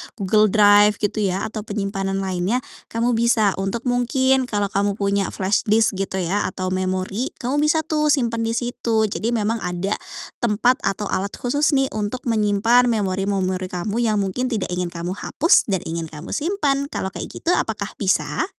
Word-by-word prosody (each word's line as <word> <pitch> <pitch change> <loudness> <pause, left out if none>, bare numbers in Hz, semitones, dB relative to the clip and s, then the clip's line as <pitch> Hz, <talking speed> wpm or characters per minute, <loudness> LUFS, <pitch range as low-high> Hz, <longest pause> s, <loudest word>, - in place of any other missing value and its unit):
Google 210 +1 +3
Drive, 205 0 +5
gitu 205 +1 -2
ya, 195 -2 0
atau 220 0 -4
penyimpanan 195 -2 -2
lainnya, 190 +6 -1 0.2
kamu 230 +2 0
bisa 230 -3 +3
untuk 195 +5 -2
mungkin 260 +1 +2
kalau 205 -3 -1
kamu 200 0 0
punya 200 -1 0
flashdisk, 205 +1 +1
gitu 195 -1 -3
ya, 195 +4 0
atau 185 0 -4
memori, 185 +5 -1 0.2
kamu 265 +4 0
bisa 305 +1 +2
tuh 305 -1 0
simpan 240 -6 +1
di 230 0 -1
situ. 235 -2 0
Jadi, 220 +3 -1
memang 225 +1 0
ada 180 +2 -2 0.4
tempat 240 +3 +2
atau 195 +1 -2
alat 200 +2 -2
khusus 290 +4 +1
nih 270 0 +1
untuk 215 +4 -3
menyimpan 225 +2 +3
memori-memori 195 -3 0
kamu 195 +5 -3
yang 220 -3 +1
mungkin 195 +6 -2
tidak 225 -6 -2
ingin 180 -1 -3
kamu 175 +3 -4
hapus 325 - +3
dan 190 -4 -1
ingin 165 0 -3
kamu 155 0 -10
simpan. 290 -5 0
Kalau 190 -8 -4
kayak - - -7
gitu - - -4
apakah 215 - 0
bisa? 195 - 0
210 Hz, 170 wpm, -21 LUFS, 195-240 Hz, 0.4 s, Drive